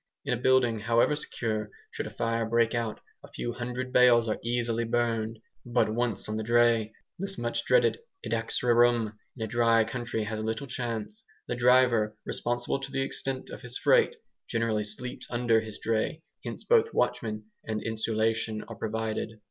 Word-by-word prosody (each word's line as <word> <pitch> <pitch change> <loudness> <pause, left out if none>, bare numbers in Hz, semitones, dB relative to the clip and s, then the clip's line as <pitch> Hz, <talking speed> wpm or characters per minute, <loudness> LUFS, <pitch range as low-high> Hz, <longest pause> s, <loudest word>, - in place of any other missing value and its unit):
In 135 - 0
a 120 - -2
building, 125 -3 +3
however 115 +6 +3
secure, 110 -7 -3 0.2
should - - -4
a - - -5
fire 115 0 -1
break 115 0 +2
out, 115 -2 -2 0.2
a - - -10
few 120 - -4
hundred 125 +1 -4
bales 120 -2 +6
are 110 - -1
easily 120 0 0
burned; 115 -1 0 0.3
but 120 -3 +1
once 115 -4 -1
on 110 0 -2
the 110 - -2
dray, 115 -1 +3 0.3
this 195 0 -3
much 120 0 -2
dreaded - - +4 0.3
"edax 115 +1 -1
rerum" 120 -2 +4 0.2
in 110 - -3
a - - -5
dry 115 0 +4
country 115 -1 -3
has 110 0 -3
little 110 +5 -2
chance. 125 - -4 0.2
The 120 - -2
driver, 120 -3 +4
responsible 120 +3 -1
to 135 0 -7
the 135 0 0
extent 135 -1 -4
of - - -8
his 125 -1 -5
freight, 475 -1 +4 0.3
generally 115 -2 0
sleeps 125 +5 -6
under 120 -2 +2
his 110 -2 -8
dray; 115 +8 -1 0.2
hence - - -6
both 455 -1 +3
watchman 110 -1 -1
and 110 -1 -3
insulation 110 0 -1
are - - -9
provided. 110 0 -3
115 Hz, 170 wpm, -28 LUFS, 110-125 Hz, 0.3 s, bales